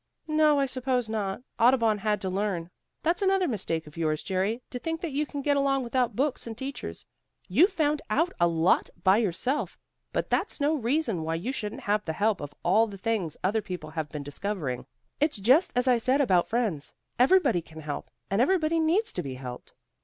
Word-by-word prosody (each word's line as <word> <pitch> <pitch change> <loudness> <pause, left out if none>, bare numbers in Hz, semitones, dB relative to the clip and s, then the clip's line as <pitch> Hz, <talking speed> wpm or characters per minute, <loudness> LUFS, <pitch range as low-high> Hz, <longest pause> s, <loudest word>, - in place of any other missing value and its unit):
"No, 305 -2 +4
I 275 - +3
suppose 255 -2 -1
not. 215 0 -3 0.2
Audubon 230 -3 +4
had 210 +1 0
to 190 - -2
learn. 185 -3 -2 0.3
That's 340 +5 +1
another 385 -2 +3
mistake 170 - -2
of 150 +1 -14
yours, 155 -2 0
Jerry, 200 +5 -1
to 250 - -4
think 325 +5 -3
that 335 - -3
you 290 +2 -1
can 285 -1 -5
get 285 0 +2
along 275 -1 +2
without 245 0 0
books 270 -1 -1
and 225 -1 -6
teachers. 265 - -6 0.4
You've 320 - +4
found 300 -4 +1
out 320 +11 +1
a 175 - +5
lot 165 +1 +2
by 190 +2 +5
yourself, 235 - -1 0.3
but - - -2
that's - - 0
no 290 +2 +2
reason 245 - 0
why 160 +1 -2
you 190 +10 -2
shouldn't 210 -6 -5
have 210 +1 0
the 160 - -3
help 205 +1 +1
of 145 0 -7
all 225 +1 +4
the 200 -2 -8
things 200 -6 -2
other 210 +4 +1
people 180 -6 -6
have 160 -2 -3
been 145 0 -6
discovering. 145 -3 -4 0.3
It's 300 -3 +1
just 255 - +4
as 250 +1 +1
I 245 -2 +4
said 255 +4 +2
about 185 -11 +3
friends. 215 -11 -1 0.2
Everybody 265 - +4
can 160 -1 -12
help, 150 -1 -5 0.2
and 200 +3 +3
everybody 325 +2 +2
needs 345 +8 +2
to 180 - -2
be 135 -5 -6
helped." 125 -1 -8
225 Hz, 200 wpm, -27 LUFS, 180-280 Hz, 0.4 s, a